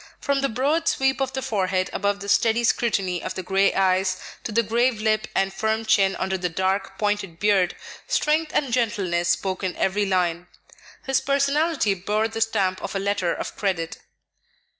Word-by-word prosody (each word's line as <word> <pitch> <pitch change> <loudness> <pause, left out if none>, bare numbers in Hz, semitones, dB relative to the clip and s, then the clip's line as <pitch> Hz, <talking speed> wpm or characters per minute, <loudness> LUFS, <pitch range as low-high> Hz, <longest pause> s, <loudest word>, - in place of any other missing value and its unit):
From 280 -1 0
the 275 - +1
broad 285 +8 0
sweep 270 0 +1
of 265 -1 -1
the 265 - -3
forehead 185 -3 -1
above 200 0 -1
the 200 - -6
steady 225 +3 +3
scrutiny 195 -7 +1
of - - -5
the 185 - -4
gray 195 +2 +2
eyes, 185 0 +2 0.2
to - - -4
the 230 +2 +2
grave 235 +2 +1
lip 215 -1 +1
and 195 0 +1
firm 220 +3 -1
chin 195 -3 +3
under 190 0 -2
the 180 0 -1
dark, 190 +3 -1
pointed 205 -5 -1
beard, 200 -4 +2 0.3
strength 305 +1 +1
and 270 -5 +1
gentleness 190 -8 0
spoke 185 +2 -1
in 185 -1 -2
every 200 +2 0
line. 180 -2 0 0.6
His 270 -1 +1
personality 280 -3 +1
bore 210 +4 -1
the 225 0 -6
stamp 190 -4 0
of - - -5
a - - 0
letter 195 -3 0
of - - -5
credit. 175 -5 -2
205 Hz, 180 wpm, -24 LUFS, 190-235 Hz, 0.6 s, steady